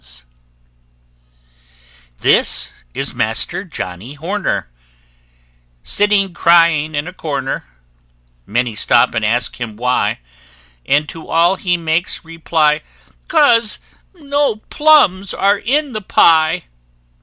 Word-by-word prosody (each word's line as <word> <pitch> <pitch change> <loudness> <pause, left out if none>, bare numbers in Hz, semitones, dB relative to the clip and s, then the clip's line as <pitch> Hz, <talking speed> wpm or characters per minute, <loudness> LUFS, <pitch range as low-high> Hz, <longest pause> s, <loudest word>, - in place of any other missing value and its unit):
This - - +2 0.2
is - - -1
Master - - -1
Johnnie 95 +10 -8
Horner, 190 - -3 1.2
Sitting 200 -2 +2
crying 165 -3 +3
in 145 +3 -3
a 180 - -8
corner; 140 -6 -4 0.8
Many 120 +2 -1
stop 120 +3 +2
and 115 -2 -2
ask 115 +2 -1
him 110 -3 -5
why, 125 +2 0 0.7
And 150 +1 +2
to 165 - -10
all 170 +3 +2
he 180 -2 -1
makes 165 +1 -2
reply, 160 -2 0 0.5
"'Cause 235 -9 +3 0.4
no 285 -6 -1 0.2
plums 290 -12 +3
are 200 +1 +2
in 280 +3 -1
the 215 - -4
pie!" 160 -4 +3
165 Hz, 100 wpm, -16 LUFS, 145-205 Hz, 1.2 s, crying